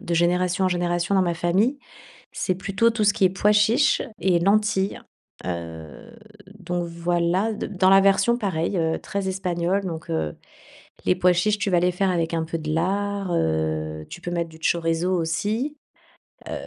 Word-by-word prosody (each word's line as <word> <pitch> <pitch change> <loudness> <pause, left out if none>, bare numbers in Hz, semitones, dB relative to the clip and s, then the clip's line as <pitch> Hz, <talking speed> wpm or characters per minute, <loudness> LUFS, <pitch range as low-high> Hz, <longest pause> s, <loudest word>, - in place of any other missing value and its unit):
de 170 - -3
génération 180 +2 +1
en - - +3
génération 175 +1 0
dans 190 - +4
ma 170 -1 0
famille, 195 +11 +1 0.5
c'est 185 - -1
plutôt 195 +5 +1
tout 220 -2 0
ce 205 - +5
qui 190 - +1
est - - +6
pois 205 +2 +2
chiches 225 +8 +3 0.2
et 175 0 +3
lentilles. 200 +1 +1 0.5
Heu, 85 - -7 0.4
donc 175 -1 -3
voilà, 175 +5 0
de - - -4
dans 190 -2 +2
la 195 - +7
version, 200 +5 +3
pareil, 185 -4 -1
heu, 160 -1 0
très 195 -1 -4
espagnole. 185 +1 -1
Donc, 165 -3 -6
heu, 80 -2 -2 0.7
les 180 - +3
pois 180 0 +3
chiches, 205 +4 +1
tu 205 - 0
vas 175 - +4
les 180 +1 +2
faire 190 +1 0
avec 170 -1 -1
un 165 -1 0
peu 165 +1 -3
de 155 -1 -3
lard, 195 +2 -1
heu, 80 - -1
tu 175 - -9
peux 175 - -5
mettre 170 -1 -2
du 160 0 -15
chorizo 165 +2 0
aussi. 210 - -1 0.7
Heu, - - -6
180 Hz, 180 wpm, -23 LUFS, 165-200 Hz, 0.7 s, la